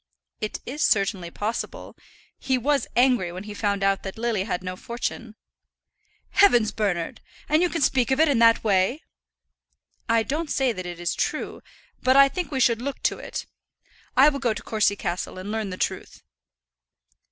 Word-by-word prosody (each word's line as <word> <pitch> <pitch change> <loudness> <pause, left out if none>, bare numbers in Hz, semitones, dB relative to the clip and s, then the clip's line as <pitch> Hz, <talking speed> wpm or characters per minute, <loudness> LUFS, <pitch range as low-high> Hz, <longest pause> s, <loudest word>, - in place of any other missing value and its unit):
"It 215 - -4
is 290 +4 -5
certainly 195 - +1
possible. 210 +6 -5 0.4
He 260 -1 0
was 275 +1 +1
angry 245 -8 +3
when 185 +2 -7
he 210 0 -8
found 200 -1 -1
that 195 0 0
Lily 225 -4 -1
had 185 -3 -3
no 185 0 -4
fortune." 235 +1 -5 1.0
"Heavens, 240 - +5
Bernard! 185 -6 -2 0.3
And 305 +2 +3
you 355 - +3
can 335 -4 -1
speak 250 -2 +2
of 265 +2 +1
it 320 - +5
in 275 -5 +2
that 230 0 +5
way?" 205 +7 +1 1.1
"I 230 0 +3
don't 305 +6 -3
say 270 -2 +1
that 185 -5 -6
it 175 -1 -7
is 175 -1 -1
true; - - -3 0.4
but 260 +1 +3
I 275 0 +7
think 355 +5 -4
we 270 - -2
should 235 -2 +3
look 280 +2 -5
to - - 0
it. - - -6 0.7
I 275 +3 +8
will 280 -2 -4
go 240 -5 0
to - - -7
Courcy 210 -2 +1
Castle 180 -1 -4
and 190 +3 -6
learn 220 -2 -2
the 185 - -6
truth." - - -4
230 Hz, 175 wpm, -24 LUFS, 195-265 Hz, 1.1 s, I